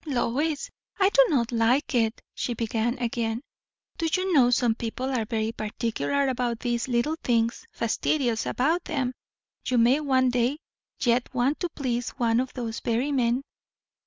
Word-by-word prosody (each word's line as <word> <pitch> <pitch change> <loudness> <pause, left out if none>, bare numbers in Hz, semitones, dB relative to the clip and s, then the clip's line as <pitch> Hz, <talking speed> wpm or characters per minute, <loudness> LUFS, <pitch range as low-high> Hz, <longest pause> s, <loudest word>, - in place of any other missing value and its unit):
"Lois, 285 +3 -1 0.3
I 385 0 +5
do - - +6
not 250 -6 +1
like 240 +5 +2
it!" 225 -2 +1
she 240 - -3
began 230 +2 -1
again. 235 0 -2 0.6
"Do 330 - +1
you 370 +1 +1
know, 255 -5 +6
some 245 -2 +3
people 240 +4 -4
are 230 -4 0
very 220 0 -1
particular 235 +5 -1
about 245 -3 -1
these 240 0 -1
little 255 +6 0
things 230 -1 0
fastidious 235 0 0
about 320 +7 +1
them. 265 -5 -1 0.5
You 255 - +2
may 240 +5 +5
one 260 -4 +2
day 245 +3 +1 0.4
yet 240 0 +2
want 255 +5 +1
to 350 - -2
please 245 -6 -2
one 230 -1 +2
of 255 0 -2
those 230 -3 -4
very 240 +5 0
men." 250 -1 +1
245 Hz, 160 wpm, -26 LUFS, 235-275 Hz, 0.6 s, do